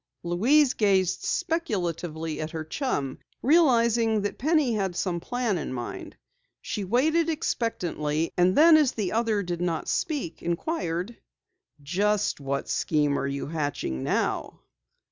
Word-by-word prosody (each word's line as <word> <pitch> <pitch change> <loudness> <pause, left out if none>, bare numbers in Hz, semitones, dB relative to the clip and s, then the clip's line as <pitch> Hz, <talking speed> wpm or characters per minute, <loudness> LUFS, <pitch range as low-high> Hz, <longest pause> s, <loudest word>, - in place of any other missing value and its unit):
Louise 250 - +3
gazed 190 -3 +2
speculatively 175 - -2
at 155 - -3
her 160 -1 -5
chum, 155 - -3 0.2
realizing 235 -7 +4
that 205 - -4
Penny 300 -4 +2
had 195 -4 -1
some 175 -2 -1
plan 235 -1 -1
in 150 - -5
mind. 120 -2 -6 0.4
She 210 - -4
waited 310 - +2
expectantly, 170 - -1
and 180 +1 +3
then 320 +1 +8
as 295 -5 +3
the 205 -5 -2
other 220 -2 +1
did 175 -1 -4
not 170 -2 -1
speak, 285 - -2
inquired: 175 - -2 0.7
"Just 200 +7 0
what 140 0 -3
scheme 145 -2 +1
are - - -1
you 140 0 -3
hatching 145 - -3
now?" - - -1
195 Hz, 130 wpm, -26 LUFS, 165-245 Hz, 0.7 s, then